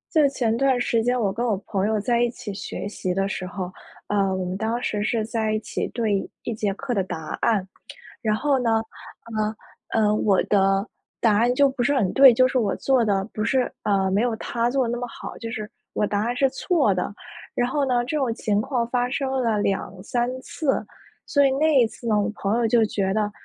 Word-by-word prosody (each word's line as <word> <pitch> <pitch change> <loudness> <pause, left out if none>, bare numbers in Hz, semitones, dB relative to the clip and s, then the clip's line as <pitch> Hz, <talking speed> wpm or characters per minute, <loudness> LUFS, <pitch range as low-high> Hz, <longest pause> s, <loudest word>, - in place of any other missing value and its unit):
就 300 -2 +6
前 240 -5 0
段 265 -1 +2
时 235 -2 +1
间 245 +2 +1
我 205 -4 +1
跟 235 +5 -2
我 220 -4 +2
朋 195 -1 0
友 220 0 +1
在 235 +3 +1
一 240 - +3
起 235 -3 -7
学 195 - -6
习 190 -3 -3
的 195 +1 0
时 185 -1 -4
候， 180 0 -5 0.4
呃， 195 -2 +1
我 185 - -2
们 180 +1 -3
当 225 +3 -1
时 210 - -1
是 220 0 0
在 220 -1 -1
一 215 - +1
起 - - -3
对 215 -5 -1
一 235 - -3
节 210 -2 -1
课 255 +5 -4
的 200 - +1
答 175 -4 -6
案。 210 -5 +2 0.6
然 215 -3 +1
后 275 +3 +1
呢， 225 -2 +2 1.1
呃 225 - +2
呃， 210 -1 +3
我 205 -2 +2
的 195 0 +2 0.4
答 215 -3 +4
案 240 +3 +3
就 280 +1 +5
不 265 -2 -4
是 280 +4 +2
很 210 -9 +1
对， 270 -2 +8
就 255 +3 +4
是 255 - +1
我 210 -6 +1
做 260 -4 +2
得 195 -2 +1
不 215 - -4
是， 255 +1 +1
呃， 195 -2 +1
没 200 +2 +2
有 240 -1 +1
他 235 +1 -1
做 265 +1 +1
得 - - -2
那 240 - -2
么 245 0 -4
好， 230 - -9
就 230 - -6
是 215 -2 -5 0.2
我 210 - +1
答 205 0 -1
案 240 +1 -1
是 270 +2 +3
错 275 - +1
的。 185 +2 -3 0.4
然 245 0 +1
后 285 +1 +1
呢， 245 -2 +1
这 285 +5 -2
种 260 -5 0
情 210 -2 0
况 245 +1 -1
发 245 0 0
生 270 0 -2
了 235 -5 +1
2-3 200 +5 -1
次。 275 0 -1 0.4
所 285 -1 +3
以 270 - +3
那 290 +1 +3
一 230 - +4
次 235 - -13
呢， 215 -2 +3
我 205 +2 0
朋 205 +3 0
友 235 -1 +2
就 230 0 +4
觉 195 -3 0
得， 210 -1 0
225 Hz, 245 characters per minute, -24 LUFS, 205-250 Hz, 1.1 s, 对